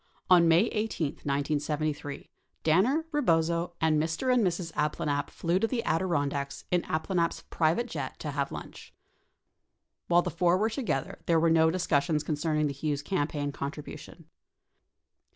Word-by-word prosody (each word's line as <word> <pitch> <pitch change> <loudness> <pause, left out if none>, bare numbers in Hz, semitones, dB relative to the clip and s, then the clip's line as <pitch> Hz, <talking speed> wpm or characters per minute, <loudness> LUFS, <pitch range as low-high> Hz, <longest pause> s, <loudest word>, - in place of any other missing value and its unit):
On 175 -2 +7
May 165 +2 +6
18, 215 -9 -2
1973, 145 0 -2 0.3
Danner, 225 - +3
Rebozo, 170 - +1
and 155 -2 +3
Mr. 165 +11 0
and 245 -3 +3
Mrs. 175 -2 -1
Ab 150 0 0
planalp 145 -1 -1
flew 170 +2 0
to 225 - +1
the 235 -1 -2
Adirondacks 145 -5 -1
in 180 -1 +3
Abplanalp's 170 +2 -1
private 165 +9 +2
jet 145 - -5
to 150 - -5
have 140 0 -2
lunch. - - -9 1.1
While 175 0 +4
the - - -3
four 175 +1 +2
were 220 +3 +1
together, 220 - -2
there 165 -1 +4
were 165 0 +3
no 160 0 +5
discus 160 -5 +1
sions 155 -1 0
concerning 155 0 0
the 145 - -1
Hughes 145 0 -2
campaign 145 -4 -1
contribution. 140 +1 -7
160 Hz, 150 wpm, -29 LUFS, 145-180 Hz, 1.1 s, On